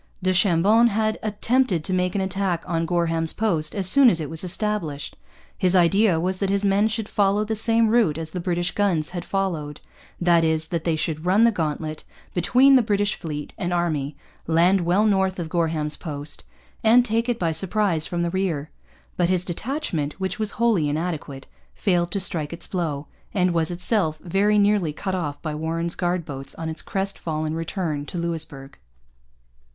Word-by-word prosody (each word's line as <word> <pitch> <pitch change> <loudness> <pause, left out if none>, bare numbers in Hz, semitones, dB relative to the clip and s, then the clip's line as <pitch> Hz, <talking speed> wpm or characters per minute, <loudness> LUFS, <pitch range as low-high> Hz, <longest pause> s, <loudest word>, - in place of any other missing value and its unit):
Du 185 0 +2
Chambon 195 +5 +4
had 215 0 0
attempted 215 -3 0
to 185 - -1
make 180 0 0
an 200 - +1
attack 190 -2 -1
on 165 -1 -1
Gorham's 165 -2 0
Post 170 -8 0
as 195 -3 +1
soon 275 +4 +6
as 170 - +1
it 155 -2 -5
was 160 +1 -3
established. 180 -6 -2 0.4
His 185 0 +1
idea 185 0 +4
was 185 +2 -1
that 195 - 0
his 200 +1 +1
men 200 +2 +3
should 220 -1 -3
follow 205 0 +1
the 220 +1 -2
same 225 +1 +3
route 215 -9 +2
as 160 -1 -5
the 180 - -4
British 175 0 -1
guns 180 -7 0
had 175 -1 -5
followed 165 -7 -3 0.4
that 175 -2 +3
is, 160 0 0
that 170 -2 -3
they 165 -2 +1
should 155 +1 -3
run 200 +5 +4
the 235 - +5
gauntlet 155 -4 -3 0.3
between 255 +10 +4
the 260 - +7
British 205 -2 +1
fleet 150 -2 -6
and 175 -1 -2
army, 155 -5 -1 0.3
land 175 +4 +3
well 180 +5 +2
north 190 -3 +1
of 170 -3 -4
Gorham's 160 -3 -1
Post, 145 -2 -7 0.4
and 235 +2 +5
take 230 +1 0
it 240 - 0
by 170 -5 0
surprise 185 -1 +1
from 175 -1 -2
the 170 - -1
rear. 165 -6 -2 0.5
But 175 -1 +2
his 185 -1 +1
detachment, 180 - -3
which 190 +5 -3
was 215 -2 0
wholly 215 -10 +2
inadequate, 150 -3 -4 0.3
failed 175 -3 +1
to 200 - 0
strike 165 -6 -1
its 170 - -7
blow, 155 -6 -3 0.3
and 180 -2 +2
was 165 -2 +1
itself 175 -2 0
very 200 +4 +2
nearly 200 -6 +2
cut 190 +5 -4
off 155 -6 -3
by 155 -2 -3
Warren's 165 +2 -2
guard 175 -2 -1
boats 135 -3 -6
on 165 -1 -5
its 160 - -3
crest 195 0 -3
fallen 155 -1 -3
return 160 -3 -3
to - - -6
Louisbourg. 160 - -4
175 Hz, 185 wpm, -23 LUFS, 160-200 Hz, 0.5 s, the